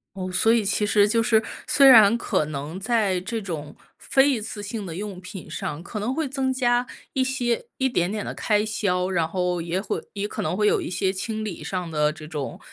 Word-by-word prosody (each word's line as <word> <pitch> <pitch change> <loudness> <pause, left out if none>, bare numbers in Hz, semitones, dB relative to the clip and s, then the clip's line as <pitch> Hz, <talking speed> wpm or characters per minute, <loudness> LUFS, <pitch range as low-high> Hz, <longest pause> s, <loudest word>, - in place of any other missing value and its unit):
哦， 185 -1 -4
所 225 +5 +3
以 230 -3 +2
其 205 +1 +1
实 205 0 +4
就 230 +2 +2
是， 220 -1 +4 0.2
虽 275 -1 +5
然 230 -3 +8
可 230 - 0
能 150 +3 -5
在 205 -2 +1
这 225 +4 -4
种 155 -6 -6 0.2
非 270 +1 +3
一 250 -6 0
次 210 -1 -6
性 205 0 -5
的 170 - -6
用 200 -2 -6
品 185 0 -9
上， 150 +3 -4
可 210 - -6
能 225 +5 -1
会 315 +1 -1
增 265 -1 -1
加 245 -1 +2 0.3
一 265 - +2
些 255 - -1
一 265 -1 +2
点 180 -7 0
点 210 -1 -3
的 - - -4
开 210 -1 +1
销， 190 -4 0
然 175 -4 +1
后 180 0 -1
也 170 +2 -2
会 195 - -3
也 205 0 -2
可 215 - -5
能 190 - -1
会 210 0 +3
有 - - +3
一 - - -4
些 190 +1 0
清 215 +3 -3
理 195 -6 -6
上 180 -3 -3
的 150 -1 +1
这 155 0 -10
种 150 -4 -5
205 Hz, 245 characters per minute, -24 LUFS, 180-230 Hz, 0.3 s, 然